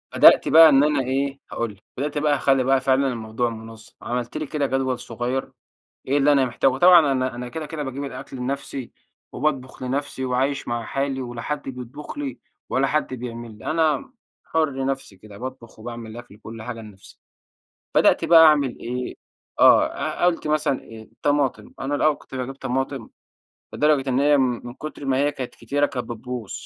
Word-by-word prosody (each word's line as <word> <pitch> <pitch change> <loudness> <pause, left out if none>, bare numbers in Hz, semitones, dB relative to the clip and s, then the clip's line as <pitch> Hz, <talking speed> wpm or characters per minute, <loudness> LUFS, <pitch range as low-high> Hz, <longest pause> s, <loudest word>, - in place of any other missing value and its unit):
بدأت - - +7
بقى 160 0 +9
إن 140 -1 +5
أنا 150 -2 +2
إيه، 135 +2 -1
هاقول 115 -2 -2
لك. 95 - -29
بدأت 145 +3 -2
بقى 145 0 +2
أخلّي 135 -2 +2
بقى 135 +1 +3
فعلًا 135 +1 +2
الموضوع 115 -1 -2
مُنظّم. 110 0 -11
عملت 120 +2 -3
لي 155 - -3
كده 145 0 -1
جدول 130 -2 -1
صغيّر 120 +3 -3 0.6
إيه 140 +2 +2
اللي 145 +1 +4
أنا 140 -2 +4
محتاجه؟ 130 +2 +1
طبعًا 170 -2 +7
أنا 130 -2 -1
أنا 125 0 -6
كده، 160 +3 -5
كده 150 0 -5
باجيب 135 +1 -5
الأكل 135 -1 -7
لنفسي، 135 0 -4 0.4
وباطبخ 130 -2 -2
لنفسي، 130 0 -3
وعايش 130 +3 -1
مع 120 -1 -2
حالي 135 +1 -2
ولا 120 -2 -6
حد 150 +3 -3
بيطبخ 130 - -8
لي، 285 -2 -4 0.3
ولا 135 +1 +1
حد 150 -2 -1
بيعمل 120 -3 -7
لي. - - -14
أنا 160 - +1 0.3
حُر 145 -5 -1
نفسي 135 -7 -4
كده 100 +1 -13
باطبخ 130 -2 -9
وباعمل 115 0 -7
الأكل 120 -2 -11
وكل 110 +1 -10
حاجة 115 0 -6
لنفسي. 105 -3 -15 0.8
بدأت - - +4
بقى 165 -1 +8
أعمل 145 -5 +3
إيه، 125 +1 -4 0.4
آه. - - +7
أ - - -2
قلت 170 -3 +1
مثلًا 150 -3 +1
الطماطم. 115 +1 -2
أنا 135 +2 -2
الأول 150 +1 +3
كنت 135 - -13
باجيب 130 +1 -4
طماطم 135 -2 -3 0.6
لدرجة 145 -2 +2
إن 130 +1 +2
هي 145 +1 +5
م - - +4 0.2
من 120 - -8
كتر 155 0 -8
ما 135 -1 +1
هي 145 +1 +2
كانت 130 -3 -6
كتيرة، 145 +1 0
كانت 130 -4 -4
بتبوظ، 120 -2 -6
135 Hz, 180 wpm, -23 LUFS, 120-145 Hz, 0.8 s, بقى